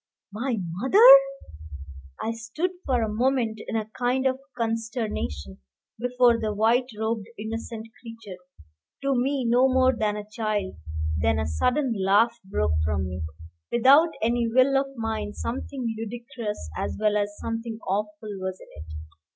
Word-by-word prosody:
My 240 +2 -2
mother! 265 - +4 1.1
I 225 - -2
stood 230 +11 -3 0.2
for 250 -4 +2
a - - 0
moment 235 -2 0
in - - -3
a 220 -1 0
kind 250 +2 0
of 260 0 +1 0.2
consternation 220 - -3 0.4
before 245 -1 +3
the 215 -1 -1
white 230 +4 +3
robed 220 -1 -2
innocent 225 +1 -5 0.2
creature, 225 -5 -10 0.6
to 275 0 +2
me 265 +1 0
no 245 +3 +4
more 260 0 +4
than 210 -2 -1
a 210 0 -7
child; 215 - -2 0.4
then 75 -1 +2
a 75 - -1
sudden 250 - +1
laugh 210 +5 +4
broke 190 - -1
from 80 +3 -1
me, 90 -1 -5 0.5
without 275 +8 +6
any 235 +1 +1
will 255 +4 +4
of 270 0 +2
mine 220 -3 -3
something 245 -1 -4
ludicrous, 225 - -6
as - - -3
well 210 -1 +2
as 205 0 -1
something 230 0 -4
awful, 210 +2 -3
was 185 0 -4
in - - -15
it. 80 -1 -11
225 Hz, 145 wpm, -25 LUFS, 210-250 Hz, 1.1 s, without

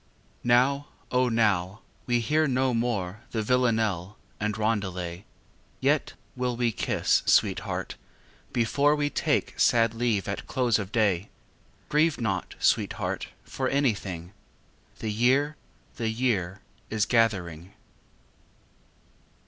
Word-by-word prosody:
Now, 130 +4 +3 0.2
O 125 0 +3
now, 105 -3 +1 0.3
we 120 -1 +2
hear 155 +6 +2
no 130 -1 +1
more 110 -5 -1
The 110 -2 -2
vilanelle 110 -6 +1 0.2
and 105 0 -1
roundelay! 95 -5 -2 0.5
Yet - - +1 0.2
will 125 -1 -2
we 120 -1 +1
kiss, - - +1
sweetheart, - - +1 0.5
before 140 +5 +2
We 145 -1 -1
take - - 0
sad 115 -1 +4
leave 115 -4 0
at 100 - -4
close 125 -4 +1
of 100 -1 -5
day. 105 -4 +1 0.6
Grieve 155 +1 +2
not, 95 -6 -2
sweetheart, - - 0 0.2
for 130 -1 -3
anythingâ 100 -11 -1 0.7
The 110 - -3
year, 130 +7 +2 0.4
the 115 -2 -1
year 105 -6 -1 0.3
is 110 -1 +1
gathering. 95 -7 0
115 Hz, 110 wpm, -27 LUFS, 100-125 Hz, 0.7 s, sad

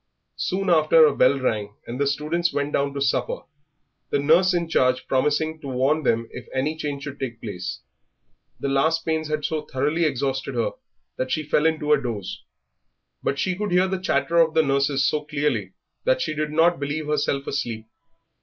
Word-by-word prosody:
Soon 190 0 -1
after 160 0 +6
a 145 - +2
bell 135 +2 +4
rang, 105 -5 -2
and 125 +4 -5
the 140 - +2
students 155 +5 0
went 145 0 -2
down 140 0 +1
to 140 - -3
supper, 125 -2 0 0.7
the - - +1
nurse 165 +6 +4
in 170 -2 0
charge 130 -5 +2
promising 155 +4 0
to 140 - -7
warn 135 +4 +1
them 115 -4 +1
if 125 - -9
any 140 +4 -1
change 145 -3 -4
should 140 -1 -7
take 120 -4 -4
place. 95 -5 -5 0.8
The - - -2
last 160 +4 +1
pains 160 -1 -1
had 155 -1 -2
so 155 -1 -1
thoroughly 150 +6 0
exhausted 135 -1 -1
her 115 -2 0 0.5
that 130 - -2
she 155 - 0
had 145 - -18
fallen 160 +1 +3
into 150 -1 +1
a 145 - +3
doze. 110 -7 -5 0.8
But 140 - -1
she 185 +4 0
could 205 0 -3
hear 180 +1 +4
the 190 0 -3
chatter 155 -2 +1
of 160 -1 +3
the 160 - +5
nurses 140 -1 +2
so 150 -1 0
clearly 150 0 -1 0.3
that - - +2
she - - -1
did 155 0 -2
not 165 +2 +3
believe 145 +2 -3
herself 145 -2 0
asleep. 115 -5 -3
145 Hz, 190 wpm, -24 LUFS, 135-160 Hz, 0.8 s, after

